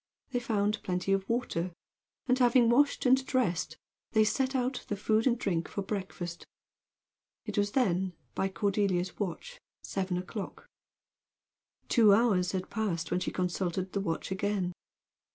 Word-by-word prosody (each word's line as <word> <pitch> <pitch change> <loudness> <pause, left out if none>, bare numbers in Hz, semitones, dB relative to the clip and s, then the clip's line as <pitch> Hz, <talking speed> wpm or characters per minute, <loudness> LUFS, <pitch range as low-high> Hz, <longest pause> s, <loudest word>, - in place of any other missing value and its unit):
They 245 - +1
found 210 -3 0
plenty 180 +1 0
of 195 0 -1
water, 185 -8 -1 0.5
and 255 0 +2
having 240 -1 +5
washed 280 +4 +3
and 260 +1 +5
dressed, 245 - 0 0.4
they 220 -1 +5
set 260 +5 0
out 255 0 -1
the 205 - -1
food 215 +3 +2
and 245 -1 +3
drink 175 -7 -1
for 200 - -4
breakfast. 185 -3 -5 1.0
It 210 -3 -4
was 205 0 +1
then, 190 -7 +1 0.2
by 195 - 0
Cordelia's 190 -2 0
watch, 220 - -4 0.2
seven 190 -2 -2
o'clock. 190 +3 -6 1.2
Two 215 -5 +6
hours 200 -5 +2
had 185 -1 -3
passed 185 -7 -2
when 180 - +2
she 180 - -2
consulted 180 0 -2
the 200 - 0
watch 165 -1 -3
again. 190 -2 -1
200 Hz, 145 wpm, -30 LUFS, 185-235 Hz, 1.2 s, Two